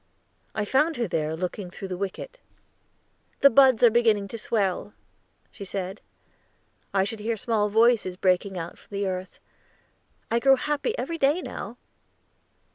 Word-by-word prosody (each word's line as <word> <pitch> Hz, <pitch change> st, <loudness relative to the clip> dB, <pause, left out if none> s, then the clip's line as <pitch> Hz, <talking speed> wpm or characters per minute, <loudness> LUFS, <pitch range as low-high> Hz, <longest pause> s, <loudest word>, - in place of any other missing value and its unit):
I 215 Hz, -1 st, -1 dB
found 295 Hz, +8 st, +2 dB
her 235 Hz, -2 st, -1 dB
there, 155 Hz, -2 st, -1 dB
looking 180 Hz, +2 st, -4 dB
through 190 Hz, +2 st, -8 dB
the 185 Hz, -, -3 dB
wicket. 200 Hz, -, -6 dB, 1.0 s
"The 280 Hz, -, +7 dB
buds 260 Hz, -1 st, +5 dB
are 235 Hz, -, +8 dB
beginning 215 Hz, -4 st, +2 dB
to 230 Hz, -, -6 dB
swell," 205 Hz, -2 st, -1 dB, 0.6 s
she 200 Hz, -, -9 dB
said. 195 Hz, 0 st, -5 dB, 0.9 s
"I 195 Hz, -1 st, +2 dB
should 215 Hz, +3 st, -4 dB
hear 225 Hz, +2 st, -2 dB
small 210 Hz, -1 st, 0 dB
voices 220 Hz, -4 st, +3 dB
breaking 185 Hz, +1 st, +1 dB
out 170 Hz, 0 st, -6 dB
from 200 Hz, -, -9 dB
the 200 Hz, -, -1 dB
earth. 185 Hz, -1 st, -5 dB, 0.9 s
I 235 Hz, -, +3 dB
grow 270 Hz, +2 st, +5 dB
happy 295 Hz, -, -2 dB
every 330 Hz, -1 st, -4 dB
day 285 Hz, +5 st, +3 dB
now." 225 Hz, +5 st, -7 dB
210 Hz, 150 wpm, -26 LUFS, 190-240 Hz, 1.0 s, are